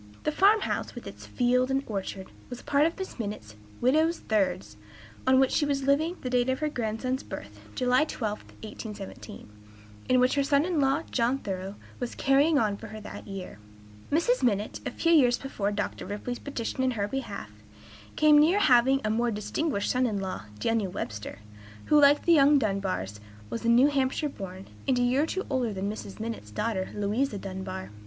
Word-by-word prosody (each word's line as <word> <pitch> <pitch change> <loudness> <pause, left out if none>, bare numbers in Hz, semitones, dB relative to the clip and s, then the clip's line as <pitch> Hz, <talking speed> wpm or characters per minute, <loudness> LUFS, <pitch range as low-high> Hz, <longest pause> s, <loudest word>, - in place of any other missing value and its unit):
The 305 - +1
farm 405 +7 +4
house, - - -3
with - - -8
its - - -10
fields 250 +1 +2
and 270 +1 +1
orchard, 195 -2 -4 0.2
was 245 -1 -7
a - - -22
part 290 +2 +3
of 330 - -4
Mrs. 380 -8 -7
Minott's 205 - -5 0.3
"widow's 315 +7 +3
thirds," 185 - -1 0.5
on 260 0 +6
which 265 -1 +3
she - - +2
was 280 -2 0
living 290 +5 +2
at - - -18
the 255 - -2
date 250 0 +2
of 260 - +1
her 305 +1 -1
grandson's 250 +1 -2
birth 105 +1 -9 0.2
(July 250 +3 +3
12, 215 -8 -3 0.2
1817), 210 -1 -8 0.6
and 255 - +5
which 250 +1 +3
her 280 - +2
son 280 +2 +3
in 350 -4 0
law, 275 +4 +2
John 245 +2 +1
Thoreau, 195 -4 -5 0.2
was 245 -1 -4
"carrying 285 +3 +3
on" 210 -5 +1
for 225 - -9
her 215 +1 -8
that 210 - -9
year. 195 - -7 0.5
Mrs. 340 +12 +2
Minott, 210 -4 0
a - - 0
few 335 - 0
years 250 -7 +5
before 210 -7 -3
Dr. 205 0 -3
Ripley's 225 +4 -4
petition 260 -2 -4
in 260 - +2
her 200 0 0
behalf, 270 +5 -5 0.6
came 300 -1 +6
near 325 +6 +5
having 265 -6 +4
a 215 - +1
more 235 +2 +1
distinguished 210 +2 -1
son 255 0 +2
in 210 -3 -2
law, 190 - -5
Daniel 215 - 0
Webster, 105 - -5 0.5
who, 300 -1 +5
like 285 +1 +5
the 340 - +6
young 290 -1 +6
Dunbars, 195 - -2 0.3
was 115 - -4
New 235 +3 +6
Hampshire 275 +1 0
born, 190 -5 -8 0.2
and 260 -2 +3
a 245 - +2
year 250 +3 +3
or - - +2
two 380 +3 -3
older 255 -4 0
than 200 +1 -2
Mrs. 210 -1 -8
Minott's 225 - -5
daughter, 190 - -2
Louisa 210 +4 0
Dunbar. 190 - -6
245 Hz, 190 wpm, -28 LUFS, 205-280 Hz, 0.6 s, on